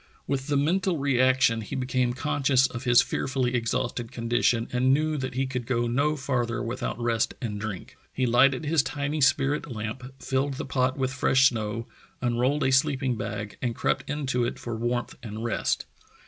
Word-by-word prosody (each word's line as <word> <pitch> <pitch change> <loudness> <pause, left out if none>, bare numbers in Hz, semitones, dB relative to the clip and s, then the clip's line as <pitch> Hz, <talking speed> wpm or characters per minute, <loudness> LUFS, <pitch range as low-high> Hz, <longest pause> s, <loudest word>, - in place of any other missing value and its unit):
With 135 -1 -2
the 145 -1 +1
mental 175 +5 +1
reaction 130 -4 +3
he 105 - -6
became 125 -1 0
conscious 135 0 +2
of 125 -1 -5
his 120 -1 +6
fearfully 130 -2 -1
exhausted 120 0 -1
condition 115 -1 +1
and 125 +1 +3
knew 155 +3 +2
that 130 -3 -4
he 135 +1 +1
could 125 -2 -4
go 120 -2 +1
no 140 +6 +1
farther 125 -4 -1
without 120 0 -3
rest 115 -2 0
and 105 -4 -4
drink. 105 -4 -6 0.2
He 130 - 0
lighted 130 +4 +4
his 155 0 +3
tiny 145 +2 -3
spirit 140 +2 +2
lamp, 115 +4 -5
filled 135 +1 -1
the - - -5
pot 130 0 0
with 130 -1 -1
fresh 130 +1 +4
snow, 115 -1 -4 0.3
unrolled 125 +4 +1
a 130 - +2
sleeping 130 -1 +2
bag 105 -1 -5
and 120 -3 -1
crept - - -1
into 135 -4 -1
it 120 - -2
for 120 -1 -5
warmth 120 +2 -2
and 110 -1 -6
rest. 115 - -1
130 Hz, 175 wpm, -26 LUFS, 120-135 Hz, 0.3 s, his